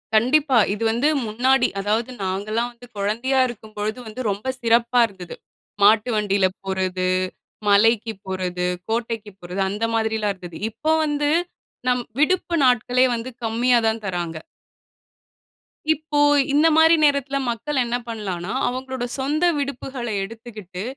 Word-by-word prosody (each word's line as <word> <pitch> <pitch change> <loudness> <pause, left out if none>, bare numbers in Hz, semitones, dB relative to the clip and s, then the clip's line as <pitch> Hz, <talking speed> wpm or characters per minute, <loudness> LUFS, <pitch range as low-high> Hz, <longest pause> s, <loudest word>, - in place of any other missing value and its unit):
கண்டிப்பா. 260 +3 +3 0.2
இது 210 - -4
வந்து 240 +6 +1 0.2
முன்னாடி 250 +3 +3
அதாவது 220 +5 -1
நாங்கல்லாம் 210 +5 -1
வந்து 240 +1 -15
குழந்தையா 235 +7 0
இருக்கும் 220 -3 -10
பொழுது 215 +3 -2
வந்து 220 +4 -6
ரொம்ப 205 +5 -6 0.2
சிறப்பா 235 +1 +3
இருந்தது. 185 -4 -10 0.5
மாட்டு 215 +3 +5
வண்டியில 200 -2 +2 0.2
போறது, 185 -1 -1 0.6
மலைக்கு 225 +2 +4
போறது, 180 -1 -2 0.2
கோட்டைக்கு 225 -2 -2
போறது 180 +2 -4
அந்த 210 +3 -4
மாதிரில்லாம் 220 -2 0
இருந்தது. 175 -3 -10
இப்ப 315 +8 0
வந்து, 295 -1 0 0.6
நம் 250 -1 +1 0.2
விடுப்பு 345 +1 +2
நாட்களே 250 +1 +3
வந்து 235 +2 -5
கம்மியா 235 +2 +2
தான் 220 0 0
தர்றாங்க. 175 -3 -3 1.5
இப்போ 305 -1 -3 0.3
இந்த 300 +3 +5
மாரி 320 +1 +7
நேரத்தில 280 -1 +2
மக்கள் 260 +4 -1
என்ன 240 +1 -1
பண்ணலாம்ன்னா, 195 -6 -4
அவங்களோட 260 0 -4 0.2
சொந்த 295 +5 0
விடுப்புகளை 265 -4 -4
எடுத்துகிட்டு 210 -4 -8
230 Hz, 125 wpm, -22 LUFS, 205-255 Hz, 1.5 s, மாரி